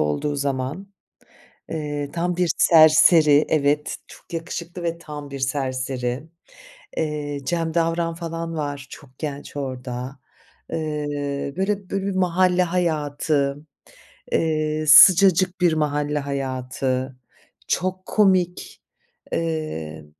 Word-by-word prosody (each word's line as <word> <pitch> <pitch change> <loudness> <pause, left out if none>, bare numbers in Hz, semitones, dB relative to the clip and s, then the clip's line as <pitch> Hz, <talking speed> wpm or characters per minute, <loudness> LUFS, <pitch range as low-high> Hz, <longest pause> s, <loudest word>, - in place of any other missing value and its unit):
olduğu 75 - -1
zaman. 140 +7 -3 0.8
Eee, 145 -2 -4
tam 175 +1 -1
bir 180 -2 +2
serseri 155 -2 +6
Evet, 150 -1 +1
çok - - -16
yakışıklı 170 +1 -5
ve 170 0 -2
tam 150 -3 -9
bir 140 - -6
serseri. 130 -1 -2 0.7
Eee, 150 -2 -2
Cem 165 +1 -1
Davran 165 0 0
falan 165 -1 -5
var, 145 -2 -4
çok 140 - -12
genç 145 -1 -6
orada. 130 -1 -5 0.5
Eee, 145 -3 -3
böyle 195 0 -1
böyle, 195 0 -2
bir 195 - -2
mahalle 180 0 +2
hayatı, 150 -5 0 0.8
eee, 155 -1 0
sıcacık 185 +3 +7
bir 175 -2 +4
mahalle 150 -1 0
hayatı, 130 -1 -3 0.5
çok 185 0 -2
komik. 185 -4 +1 0.5
Eee, 155 - -3
150 Hz, 105 wpm, -22 LUFS, 140-170 Hz, 0.8 s, sıcacık